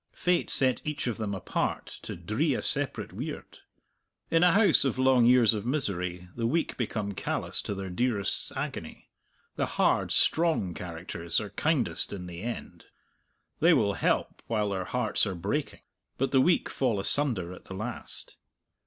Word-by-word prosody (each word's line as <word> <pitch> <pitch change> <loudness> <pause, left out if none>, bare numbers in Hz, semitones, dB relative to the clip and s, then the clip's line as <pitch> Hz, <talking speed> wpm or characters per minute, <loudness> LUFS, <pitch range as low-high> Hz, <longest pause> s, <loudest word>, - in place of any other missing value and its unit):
Fate 180 -1 0
set 130 -2 +4
each 150 -1 -3
of 120 -3 -2
them 105 -3 -3
apart 95 - -2 0.2
to - - -6
dree - - 0
a - - -3
separate - - -1
weird. - - -7 0.7
In 165 +1 +4
a 180 - +6
house 205 0 +6
of 135 -2 -1
long 130 -2 +4
years 120 -3 +6
of 105 -2 -3
misery 90 - -2
the 115 -1 -1
weak 165 +7 0
become 105 -4 -3
callous 100 - -2
to 100 - -4
their 95 -1 -5
dearest's 105 0 -1
agony. - - -6 0.5
The - - 0
hard, - - +2
strong 160 - +2
characters 85 -1 -3
are 105 -2 -6
kindest 145 0 0
in 95 -3 -6
the 85 -1 -8
end; 120 +2 -6 0.7
they - - +5
will - - +2
help - - -1
while 105 -2 0
their 95 -2 -2
hearts 115 -2 +1
are 95 - -3
breaking. 85 - -3 0.4
But 135 - 0
the 135 - +5
weak 175 +6 +3
fall 120 -6 0
asunder 100 -6 +3
at - - -13
the 95 - -8
last. 110 +5 -6
115 Hz, 165 wpm, -28 LUFS, 95-130 Hz, 0.7 s, a